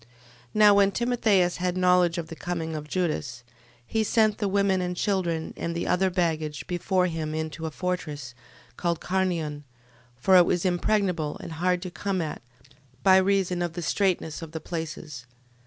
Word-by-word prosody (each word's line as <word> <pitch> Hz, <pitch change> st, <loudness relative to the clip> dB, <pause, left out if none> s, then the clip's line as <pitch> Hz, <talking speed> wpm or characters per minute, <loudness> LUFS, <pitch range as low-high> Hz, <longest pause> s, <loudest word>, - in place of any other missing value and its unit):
12:21. 110 Hz, -, -24 dB, 0.5 s
Now 210 Hz, -1 st, +7 dB
when 200 Hz, 0 st, +4 dB
Timotheus 215 Hz, -6 st, +2 dB
had 180 Hz, 0 st, -1 dB
knowledge 180 Hz, -1 st, +3 dB
of 165 Hz, -2 st, -4 dB
the 165 Hz, -, -7 dB
coming 165 Hz, -2 st, -4 dB
of 150 Hz, -1 st, -6 dB
Judas, 150 Hz, -8 st, -2 dB, 0.4 s
he 220 Hz, -, 0 dB
sent 215 Hz, 0 st, +2 dB
the 205 Hz, -, 0 dB
women 195 Hz, -1 st, +2 dB
and 180 Hz, 0 st, -2 dB
children, 175 Hz, -6 st, -1 dB
and 170 Hz, 0 st, -4 dB
the 170 Hz, -, -2 dB
other 190 Hz, +1 st, +2 dB
baggage, 160 Hz, -5 st, -1 dB
before 180 Hz, +1 st, 0 dB
him 160 Hz, -3 st, -3 dB
into 160 Hz, +1 st, -4 dB
a -, -, -2 dB
fortress, 150 Hz, -6 st, -4 dB, 0.4 s
called 170 Hz, -2 st, -1 dB
Carnion: 170 Hz, -6 st, -1 dB, 0.5 s
for 185 Hz, +10 st, +3 dB
it 175 Hz, -, +6 dB
was 180 Hz, +1 st, 0 dB
impregnable, 180 Hz, -3 st, 0 dB
and -, -, -8 dB
hard 180 Hz, +2 st, 0 dB
to 180 Hz, -, -6 dB
come 195 Hz, +1 st, -2 dB
at, 155 Hz, -3 st, -4 dB, 0.6 s
by 190 Hz, -1 st, +7 dB
reason 190 Hz, -2 st, +2 dB
of 175 Hz, -1 st, -2 dB
the 175 Hz, 0 st, -5 dB
straitness 180 Hz, -4 st, 0 dB
of 165 Hz, -1 st, -9 dB
the 160 Hz, -, -3 dB
places. 155 Hz, -6 st, -6 dB
175 Hz, 170 wpm, -26 LUFS, 160-190 Hz, 0.6 s, Now